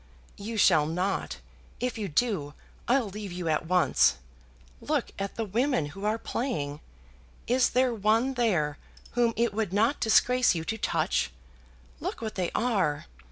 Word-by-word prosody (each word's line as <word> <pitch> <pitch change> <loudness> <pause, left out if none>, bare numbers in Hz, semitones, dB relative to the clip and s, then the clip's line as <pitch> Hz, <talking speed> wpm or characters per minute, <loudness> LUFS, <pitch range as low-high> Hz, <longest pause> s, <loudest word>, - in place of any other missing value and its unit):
"You 220 +3 -5
shall 155 -6 +5
not. 180 - -2 0.4
If 250 +1 -2
you 205 - -2
do, 155 -5 -1 0.3
I'll 250 -2 +2
leave 200 0 -7
you 175 -1 -4
at 155 0 0
once. 180 - +4 0.7
Look - - -1
at 195 0 -4
the 225 - -2
women 230 - 0
who 195 +4 -7
are 215 +1 +1
playing. 150 - -3 0.7
Is 250 +1 +3
there 255 -1 +2
one 225 +5 +2
there 175 - 0 0.3
whom 240 -1 +2
it 230 -2 +1
would 215 -3 -1
not 220 +8 +2
disgrace 250 +1 +4
you 165 - -2
to 220 +7 -3
touch? - - 0 0.7
Look - - -4
what 220 -2 -4
they 180 -3 -1
are. 195 -11 0
210 Hz, 155 wpm, -28 LUFS, 175-235 Hz, 0.7 s, shall